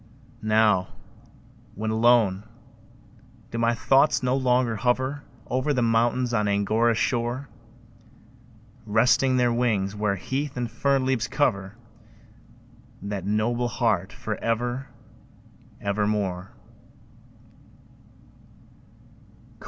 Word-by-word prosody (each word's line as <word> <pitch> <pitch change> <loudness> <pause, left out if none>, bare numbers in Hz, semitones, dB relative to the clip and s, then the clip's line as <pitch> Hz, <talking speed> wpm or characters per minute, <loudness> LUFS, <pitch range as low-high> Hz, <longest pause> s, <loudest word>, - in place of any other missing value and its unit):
Now, 110 -4 +3 0.9
when 110 +2 -3
alone, 110 -4 +3 1.1
do 115 - -3
my 115 0 +2
thoughts 135 +4 +3
no 125 +1 +1
longer 125 -3 +1
hover 130 +5 0 0.2
Over 130 +3 -1
the 125 - +1
mountains 120 +2 +1
on 105 -2 +1
Angora's 110 +3 +1
shore, 120 +3 -1 1.4
Resting 125 +4 +3
their 120 -1 +2
wings, 105 -5 0
where 105 -1 0
heath 140 +6 -4
and 120 -2 -3
fern 135 +2 +1
leaves 130 -4 0
cover 120 -7 -1 1.3
That 100 -2 -4
noble 120 +4 0
heart 110 -7 0
for 105 -1 -5
ever, 120 +3 -2 0.9
ever 100 +1 0
more? 100 -3 -2
115 Hz, 95 wpm, -25 LUFS, 105-125 Hz, 1.4 s, Now